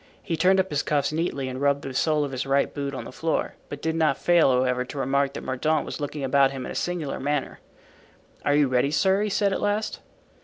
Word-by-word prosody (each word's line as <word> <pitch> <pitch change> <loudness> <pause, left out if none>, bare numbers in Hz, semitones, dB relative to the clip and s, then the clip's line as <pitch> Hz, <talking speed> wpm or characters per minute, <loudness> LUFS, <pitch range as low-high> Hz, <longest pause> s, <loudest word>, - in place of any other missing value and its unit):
He 165 - -2
turned 185 +4 +4
up 190 -2 0
his 145 -1 +1
cuffs 145 -1 0
neatly 155 -4 -1
and 130 +1 -5
rubbed 140 0 +2
the 135 - -5
sole 150 +2 +2
of 140 - -3
his 130 +1 -3
right 140 +1 +1
boot 140 -1 -4
on - - -5
the - - -9
floor, 160 +4 -1 0.2
but 145 0 -7
did 160 0 0
not 155 -4 +2
fail, 175 -4 +4
however, 125 0 +1
to 130 +3 -9
remark 140 +1 +1
that - - -6
Mordaunt 150 +4 0
was - - -6
looking 145 0 -4
about 135 +1 +4
him 135 -2 -6
in - - -6
a - - -5
singular 175 -5 -3
manner. 145 +1 -2 0.8
"Are 145 - +2
you 145 -1 +4
ready, 130 +2 +2
sir?" 190 +6 +2
he 210 - 0
said 200 0 +1
at - - -2
last. 205 +1 -1
145 Hz, 240 wpm, -25 LUFS, 135-160 Hz, 0.8 s, turned